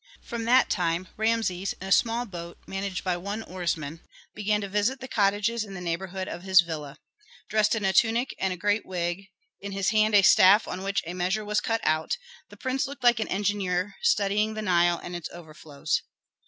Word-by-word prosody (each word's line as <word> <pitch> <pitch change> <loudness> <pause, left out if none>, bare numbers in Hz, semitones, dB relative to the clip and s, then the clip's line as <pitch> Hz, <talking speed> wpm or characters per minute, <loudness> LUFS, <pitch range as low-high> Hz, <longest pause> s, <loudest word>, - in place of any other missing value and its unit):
From 235 -2 -5
that 250 +3 +5
time 175 0 0
Rameses, 220 -4 0
in 190 - -7
a - - -6
small 235 +3 +3
boat 170 -5 -8
managed 195 -1 -4
by 180 -2 0
one 200 +5 -5
oarsman, 165 -4 -4 0.3
began 210 0 0
to 200 - -4
visit 210 +7 0
the 260 - -7
cottages 210 +1 +1
in 200 -2 -9
the - - -6
neighborhood 185 +2 -4
of 175 - -6
his 190 -1 +6
villa. 155 -4 -6 0.5
Dressed 215 0 +3
in 215 -3 -2
a 190 - +2
tunic 235 +4 +2
and 190 - 0
a 180 - -4
great 205 +4 +1
wig, 180 +1 -3 0.3
in 200 0 -7
his 195 0 0
hand 215 0 +3
a 200 - +7
staff 195 +3 +6
on 185 - -5
which 195 0 -1
a 170 - -5
measure 185 +4 -1
was 210 0 0
cut 225 0 -1
out, 155 - 0 0.3
the - - -14
prince 265 +2 -1
looked 275 -1 -10
like 240 -2 +5
an 220 - -1
engineer 195 -1 -1
studying 215 - +2
the 215 - -4
Nile 175 -3 +3
and 175 - -6
its 175 -2 -5
overflows. 155 -3 -4
195 Hz, 200 wpm, -26 LUFS, 175-215 Hz, 0.5 s, a